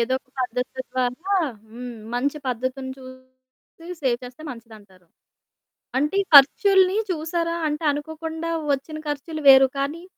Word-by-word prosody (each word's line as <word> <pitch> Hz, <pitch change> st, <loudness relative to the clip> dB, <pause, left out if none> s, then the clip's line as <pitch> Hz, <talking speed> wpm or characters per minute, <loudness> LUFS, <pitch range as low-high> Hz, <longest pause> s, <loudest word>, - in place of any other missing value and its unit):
ఏదో 245 Hz, +3 st, +1 dB
ఒక 260 Hz, -, -44 dB
పద్ధతి 250 Hz, +1 st, -3 dB
ద్వారా 255 Hz, -1 st, 0 dB, 0.6 s
హ్మ్. 245 Hz, +1 st, -8 dB, 0.2 s
మంచి 280 Hz, +4 st, -1 dB
పద్ధతిని 255 Hz, +2 st, -3 dB
చూసి 260 Hz, +6 st, -14 dB
సేవ్ 245 Hz, -3 st, +1 dB
చేస్తే 250 Hz, +5 st, -11 dB
మంచిదంటారు. 215 Hz, -6 st, -14 dB, 0.9 s
అంటే, 300 Hz, +7 st, 0 dB, 0.2 s
ఖర్చులుని 380 Hz, +6 st, +7 dB
చూశారా? 335 Hz, +1 st, -2 dB
అంటే, 300 Hz, +2 st, -4 dB
అనుకోకుండా 320 Hz, +2 st, -5 dB, 0.2 s
ఒచ్చిన 310 Hz, +3 st, -7 dB
ఖర్చులు 310 Hz, +2 st, -4 dB
వేరు, 270 Hz, 0 st, +9 dB
కానీ 290 Hz, +5 st, -3 dB
270 Hz, 120 wpm, -23 LUFS, 250-320 Hz, 0.9 s, వేరు